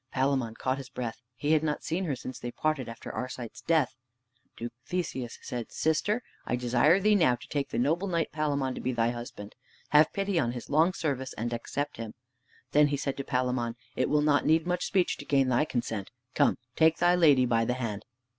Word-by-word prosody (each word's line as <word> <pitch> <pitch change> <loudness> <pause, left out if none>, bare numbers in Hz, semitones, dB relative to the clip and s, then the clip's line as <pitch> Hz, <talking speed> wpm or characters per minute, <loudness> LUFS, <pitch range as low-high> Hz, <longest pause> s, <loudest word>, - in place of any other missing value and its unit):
Palamon 130 -4 0
caught 130 +3 -1
his 130 -2 -8
breath. 120 -1 -5
He 145 +4 -1
had 155 -1 +5
not 150 -1 -2
seen 180 +4 -1
her 145 -5 -1
since 130 0 -7
they 120 - -4
parted 155 -3 -1
after 115 - -8
Arcite's 125 -2 -5
death. 160 -6 +2 0.6
Duke 120 0 -5
Theseus 130 -7 -3
said, 120 -2 -5
"Sister, 205 +9 +1 0.2
I - - -1
desire 125 +8 +3
thee 210 +2 +4
now 160 -11 +4
to - - -13
take 140 -2 -1
the - - -3
noble 160 +10 +1
knight 170 -3 0
Palamon 140 -4 0
to - - -6
be 130 - -1
thy 115 0 +2
husband. 120 -4 -8 0.4
Have 150 +1 +6
pity 195 -3 0
on 120 -5 0
his 120 +2 -7
long 160 +5 +4
service, 135 -7 -2
and 120 +2 -3
accept 145 +5 -3
him." 115 -1 -6 0.6
Then 150 0 +5
he 145 0 -1
said 140 0 -2
to 140 - -3
Palamon, 125 -3 -1 0.2
"It 130 - +1
will 150 0 +3
not 145 -1 +3
need 160 +1 +3
much 180 0 0
speech 185 -3 +1
to - - -9
gain 135 -2 +3
thy 125 +4 +3
consent! 115 -7 -3 0.2
Come, - - +3 0.2
take 160 0 +4
thy 175 0 +4
lady 150 -7 +5
by 115 -2 +2
the 125 +2 0
hand." 115 -5 -4
135 Hz, 210 wpm, -29 LUFS, 120-160 Hz, 0.6 s, Have